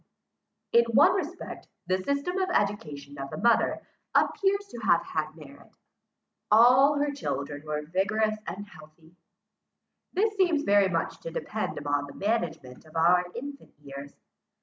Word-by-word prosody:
In 235 0 +5
one 295 +9 +6
respect, 360 -1 -5 0.2
the 185 0 0
system 280 - -1
of 375 -1 0
education 150 - -2
of 135 0 -5
the - - -7
mother 235 +2 +2 0.3
appears 400 0 +2
to 235 - -7
have 175 -6 +3
had 155 0 -3
merit. 140 -3 -15 0.8
All 250 +6 +6
her 290 0 0
children 145 - -4
were 150 0 -2
vigorous 215 +5 0
and 190 +4 -5
healthy. 160 -1 -17 1.0
This 420 +3 +1
seems 345 -6 +2
very 200 -1 +4
much 165 -3 -2
to - - -7
depend 215 +6 -4
upon 145 0 -1
the - - -12
management 165 - -3
of 155 +1 -18
our 180 +2 +4
infant 280 +3 -8
years. 140 -1 -9
200 Hz, 145 wpm, -27 LUFS, -, 1.0 s, one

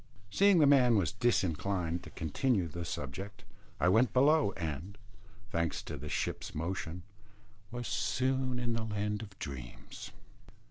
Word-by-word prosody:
Seeing 200 - +5
the 155 - +6
man 130 -4 +6
was 90 -8 +2
disinclined 90 -5 0
to - - -11
continue 90 - 0
the 85 +2 -5
subject, 85 +8 -6 0.4
I 90 - +3
went 110 +4 +4
below, 145 -2 +4
and, 85 +4 -5 0.5
thanks 85 -2 -1
to - - -6
the - - -7
ship's - - -3
motion, 85 +1 -3 0.7
was 120 +1 -5
soon 130 +3 0
in 120 -1 -1
the 115 -1 -1
land 105 -1 -2
of 100 -3 -10
dreams. 65 -5 -8
100 Hz, 140 wpm, -32 LUFS, 85-125 Hz, 0.7 s, the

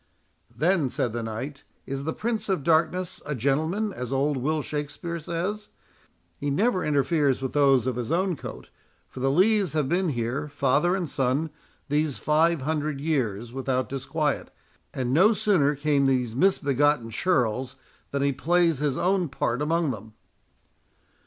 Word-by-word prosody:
"Then," 165 -4 +2
said 120 -2 -1
the 120 - -2
knight, 115 +6 -5 0.2
"is 135 0 -4
the 160 - 0
Prince 225 -2 -3
of 185 -7 0
Darkness 170 +3 +1
a 150 0 -3
gentleman, 160 - 0
as 125 -5 -5
old 140 +2 +1
Will 150 +4 -1
Shakspeare 150 +4 -4
says. 180 +7 -3 0.7
He 145 - -2
never 190 - +1
interferes 145 -1 +2
with 130 -1 -4
those 135 -4 +4
of 130 -2 -1
his 125 +3 -3
own 180 +1 +1
coat, - - -9 0.4
for - - -10
the 135 +1 +1
Lees 190 +3 +3
have 150 -3 +1
been 175 +4 +1
here, 120 +2 -2
father 145 +5 +2
and 180 -3 -2
son, 135 +3 0 0.4
these 150 -1 0
five 160 +1 +2
hundred 150 -1 -1
years, 120 -7 -1
without 130 -1 -1
disquiet; 145 +2 -2 0.4
and 125 -1 -2
no 190 +9 +6
sooner 170 -9 +2
came 145 -1 +2
these 125 -4 0
misbegotten 145 -7 +2
churls, 125 -4 0 0.3
than 140 0 -1
he 140 0 +2
plays 165 +2 +2
his 145 -3 0
own 185 -2 +1
part 125 -1 -1
among 160 0 +1
them." 110 -1 -9
145 Hz, 155 wpm, -26 LUFS, 130-170 Hz, 0.7 s, no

